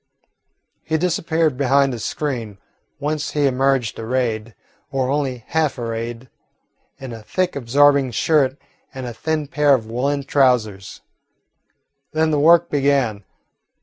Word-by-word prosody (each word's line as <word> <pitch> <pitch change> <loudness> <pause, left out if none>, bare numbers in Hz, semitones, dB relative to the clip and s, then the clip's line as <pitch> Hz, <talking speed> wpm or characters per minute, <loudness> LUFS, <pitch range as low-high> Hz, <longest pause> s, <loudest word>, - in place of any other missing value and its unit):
He 160 - 0
disappeared 160 -3 0
behind 135 0 +3
a 120 - -5
screen, 115 -3 -4 0.4
whence 150 0 -3
he 145 -1 +1
emerged 135 -2 +1
arrayed, 115 -2 -2 0.4
or 135 -1 0
only 135 -5 -2
half 155 -3 0
arrayed, 115 +1 -5 0.7
in 130 -3 -8
a 115 - -9
thick 185 - -2
absorbing 140 +1 +3
shirt 135 +2 +1 0.4
and 130 -1 -5
a 120 - -5
thin 155 +3 -2
pair 145 0 +3
of 115 -4 -4
woollen 135 +5 -1
trousers. 125 -8 +1 1.1
Then 155 0 +1
the 150 - +1
work 170 +3 +5
began. 135 -8 +1
135 Hz, 125 wpm, -20 LUFS, 120-150 Hz, 1.1 s, work